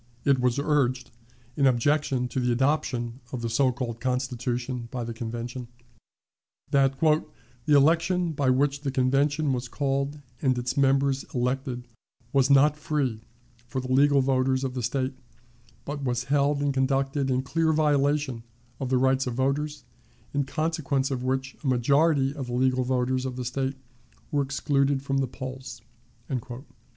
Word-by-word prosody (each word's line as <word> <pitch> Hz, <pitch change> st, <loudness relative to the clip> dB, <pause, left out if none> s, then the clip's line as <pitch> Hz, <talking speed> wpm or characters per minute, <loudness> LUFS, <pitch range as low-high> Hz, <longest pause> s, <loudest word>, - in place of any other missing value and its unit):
It 140 Hz, -2 st, +4 dB
was 125 Hz, 0 st, +1 dB
urged, 135 Hz, -4 st, +1 dB, 0.4 s
in 140 Hz, -2 st, +3 dB
objection 130 Hz, 0 st, +1 dB
to 125 Hz, -, -2 dB
the 125 Hz, -1 st, +1 dB
adoption 125 Hz, -2 st, 0 dB
of 125 Hz, -2 st, -5 dB
the 115 Hz, -, -2 dB
so 130 Hz, +2 st, +3 dB
called 120 Hz, -2 st, -4 dB
Constitution 125 Hz, -1 st, -2 dB
by 125 Hz, -1 st, -4 dB
the 115 Hz, 0 st, -5 dB
Convention, 120 Hz, +2 st, -5 dB, 1.0 s
that 135 Hz, -1 st, +3 dB
"the 155 Hz, 0 st, +2 dB, 0.4 s
election 170 Hz, +4 st, +3 dB
by 140 Hz, -3 st, 0 dB
which 140 Hz, +2 st, +2 dB
the 145 Hz, -, -2 dB
Convention 140 Hz, +3 st, +1 dB
was 125 Hz, 0 st, -3 dB
called 140 Hz, +2 st, -1 dB, 0.2 s
and 130 Hz, -3 st, +2 dB
its 125 Hz, 0 st, -2 dB
members 135 Hz, 0 st, +2 dB
elected 125 Hz, 0 st, -2 dB, 0.5 s
was 135 Hz, -1 st, +3 dB
not 140 Hz, +2 st, +5 dB
free 140 Hz, -7 st, -1 dB, 0.5 s
for 130 Hz, -, -3 dB
the 130 Hz, 0 st, -5 dB
legal 140 Hz, +1 st, +5 dB
voters 130 Hz, 0 st, +1 dB
of 130 Hz, -1 st, -2 dB
the 125 Hz, -, -3 dB
State, 130 Hz, +3 st, -1 dB, 0.7 s
but 145 Hz, 0 st, -4 dB
was 120 Hz, -2 st, -1 dB
held 145 Hz, +1 st, +1 dB
and 140 Hz, -1 st, +1 dB
conducted 135 Hz, +1 st, 0 dB
in 130 Hz, 0 st, +1 dB
clear 160 Hz, +3 st, +1 dB
violation 145 Hz, -4 st, +1 dB, 0.4 s
of 130 Hz, -, -3 dB
the 130 Hz, -, +3 dB
rights 130 Hz, +1 st, +2 dB
of 120 Hz, -, -3 dB
voters, 145 Hz, +3 st, -1 dB, 0.5 s
in 140 Hz, -1 st, +1 dB
consequence 150 Hz, -3 st, -1 dB
of 130 Hz, -2 st, -2 dB
which 130 Hz, +1 st, -2 dB
a -, -, -2 dB
majority 140 Hz, +3 st, +3 dB
of 135 Hz, -4 st, -6 dB
the 120 Hz, -, -5 dB
legal 130 Hz, +1 st, +2 dB
voters 130 Hz, 0 st, 0 dB
of 130 Hz, -1 st, -4 dB
the 125 Hz, -1 st, -4 dB
State 135 Hz, +2 st, -2 dB, 0.5 s
were 145 Hz, -, +2 dB
excluded 140 Hz, 0 st, 0 dB
from 135 Hz, 0 st, 0 dB
the 135 Hz, -, 0 dB
polls." 130 Hz, -2 st, -8 dB
135 Hz, 155 wpm, -26 LUFS, 125-140 Hz, 1.0 s, not